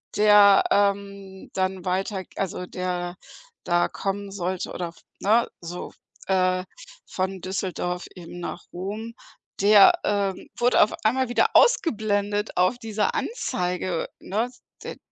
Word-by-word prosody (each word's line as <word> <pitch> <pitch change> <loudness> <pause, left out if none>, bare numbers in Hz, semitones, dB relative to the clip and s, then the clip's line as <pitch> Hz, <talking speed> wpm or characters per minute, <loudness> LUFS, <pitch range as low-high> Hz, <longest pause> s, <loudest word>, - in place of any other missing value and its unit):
der, 205 -1 +7
ähm, 200 -1 -1
dann 185 -1 -1
weiter 190 +1 -1
also 180 -1 -3
der 180 -1 -3 0.5
da 175 0 +2
kommen 200 0 -4
sollte 185 -1 -3
oder, 175 -2 -4 0.3
ne, 225 +4 +3
so, 175 +1 -7 0.4
äh, 185 -1 +2 0.4
von 190 0 -3
Düsseldorf 185 -1 -3
eben 175 -1 -10
nach 175 - -5
Rom, 210 +6 -5 0.5
der, 200 0 +8
ähm, 200 -2 -1
wurde 245 +1 +4
auf 210 - -1
einmal 255 +3 +2
wieder 245 - +2
ausgeblendet 210 - +2
auf 185 +7 +3
dieser 220 -3 -1
Anzeige, 180 - -2
ne? 225 +5 -2 0.3
D - - -7
195 Hz, 120 wpm, -24 LUFS, 185-210 Hz, 0.5 s, der